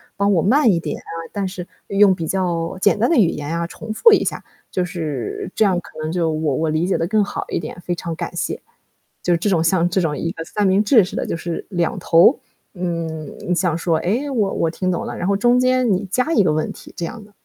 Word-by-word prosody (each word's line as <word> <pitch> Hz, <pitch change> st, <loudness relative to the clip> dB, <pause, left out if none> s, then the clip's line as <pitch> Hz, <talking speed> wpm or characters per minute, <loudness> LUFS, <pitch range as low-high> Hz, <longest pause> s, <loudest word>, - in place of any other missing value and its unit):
帮 200 Hz, 0 st, +2 dB
我 170 Hz, -, +3 dB
慢 240 Hz, -, +4 dB
一 170 Hz, -, +1 dB
点 -, -, -4 dB
啊， -, -, -12 dB, 0.2 s
但 200 Hz, -2 st, -2 dB
是 185 Hz, -1 st, -7 dB, 0.2 s
用 200 Hz, -1 st, +4 dB
比 165 Hz, -, -4 dB
较 175 Hz, -1 st, -1 dB
简 205 Hz, +3 st, +3 dB
单 230 Hz, +4 st, +2 dB
的 335 Hz, -, +3 dB
语 200 Hz, -8 st, +5 dB
言 150 Hz, +1 st, -3 dB
啊， 170 Hz, -, -2 dB
重 215 Hz, -, -8 dB
复 460 Hz, -, +6 dB
一 -, -, +4 dB
下， -, -, -3 dB, 0.3 s
就 180 Hz, -, 0 dB
是 155 Hz, -, -4 dB
这 215 Hz, -, +3 dB
样 185 Hz, -3 st, +2 dB
可 155 Hz, -, -13 dB
能 155 Hz, -, -3 dB
就 165 Hz, -2 st, 0 dB
我 155 Hz, -3 st, -1 dB
我 160 Hz, +2 st, 0 dB
理 155 Hz, +3 st, 0 dB
解 190 Hz, -, +1 dB
的 165 Hz, -, 0 dB
更 215 Hz, +2 st, +2 dB
好 -, -, -4 dB
一 -, -, -1 dB
点， 155 Hz, +1 st, -7 dB
非 175 Hz, -, -2 dB
常 170 Hz, -1 st, -5 dB
感 -, -, -5 dB
谢。” -, -, -3 dB, 0.6 s
就 175 Hz, -, 0 dB
是 -, -, +3 dB
这 175 Hz, -, -2 dB
种 170 Hz, -4 st, +2 dB
像 170 Hz, +1 st, +2 dB
这 190 Hz, +1 st, +1 dB
种 150 Hz, -4 st, -1 dB
一 165 Hz, -, -2 dB
个 165 Hz, -, -6 dB
三 210 Hz, +4 st, -1 dB
明 195 Hz, +2 st, +3 dB
治 220 Hz, -1 st, +5 dB
式 180 Hz, -, -6 dB
的， -, -, -2 dB
就 -, -, -2 dB
是 170 Hz, 0 st, -5 dB
两 175 Hz, -1 st, -1 dB
头， 175 Hz, -, +5 dB, 0.3 s
嗯， 165 Hz, -4 st, -4 dB, 0.2 s
你 180 Hz, -, +2 dB
想 175 Hz, -2 st, +1 dB
说， 165 Hz, -1 st, +1 dB
诶， 235 Hz, +11 st, -1 dB
我 215 Hz, -8 st, 0 dB
我 160 Hz, -, 0 dB
听 185 Hz, +1 st, -1 dB
懂 175 Hz, -, -2 dB
了， -, -, -5 dB
然 180 Hz, -, -2 dB
后 200 Hz, -, +2 dB
中 240 Hz, +3 st, +3 dB
间 255 Hz, -2 st, +2 dB
你 185 Hz, -, -1 dB
加 270 Hz, +8 st, +1 dB
一 -, -, +5 dB
个 160 Hz, -, +2 dB
问 155 Hz, 0 st, -1 dB
题 -, -, -12 dB
这 170 Hz, -, -2 dB
样 225 Hz, +4 st, -7 dB
的。 205 Hz, -, -18 dB
180 Hz, 280 characters per minute, -20 LUFS, 165-205 Hz, 0.6 s, 复